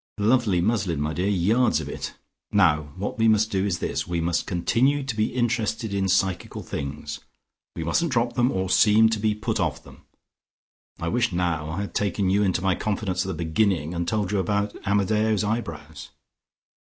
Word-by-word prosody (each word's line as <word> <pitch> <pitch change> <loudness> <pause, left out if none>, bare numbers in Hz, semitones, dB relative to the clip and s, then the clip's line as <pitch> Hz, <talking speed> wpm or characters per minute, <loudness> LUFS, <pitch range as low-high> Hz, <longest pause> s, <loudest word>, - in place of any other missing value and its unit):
Lovely 105 -4 +2
muslin, 95 -6 0
my 75 +1 -1
dear: 90 +5 -1
yards 105 +6 +2
of - - -6
it. - - -6 0.4
Now 75 -1 +3
what 100 +4 -4
we 115 - +4
must 110 0 +3
do 95 -2 0
is 90 -3 -1
this: - - -3
we 85 -1 -1
must 85 +1 -1
continue 130 +10 +1
to 135 -4 -4
be 110 0 0
interested 115 -3 -1
in 95 -1 0
psychical 95 0 0
things; 75 +2 -5 0.6
we 80 - -3
mustn't 140 - 0
drop 120 -1 +1
them, 120 0 +2
or 95 0 -1
seem 110 +3 +5
to 110 -1 -1
be 105 0 +1
put 105 - -2
off - - -1
them. - - -15 1.0
I 85 - -3
wish 115 +4 +1
now 85 -3 -1
I 85 +5 -3
had 100 - -6
taken 100 -1 0
you 100 +2 +3
into 95 -3 +1
my 95 -1 +3
confidence 95 -3 -2
at - - -7
the 95 - -3
beginning 85 -2 +1
and 85 -1 -2
told 105 -2 -1
you 105 - +1
about 100 +1 -1
Amadeo's 105 +1 +2
eyebrows." 85 - -4
100 Hz, 190 wpm, -24 LUFS, 85-110 Hz, 1.0 s, seem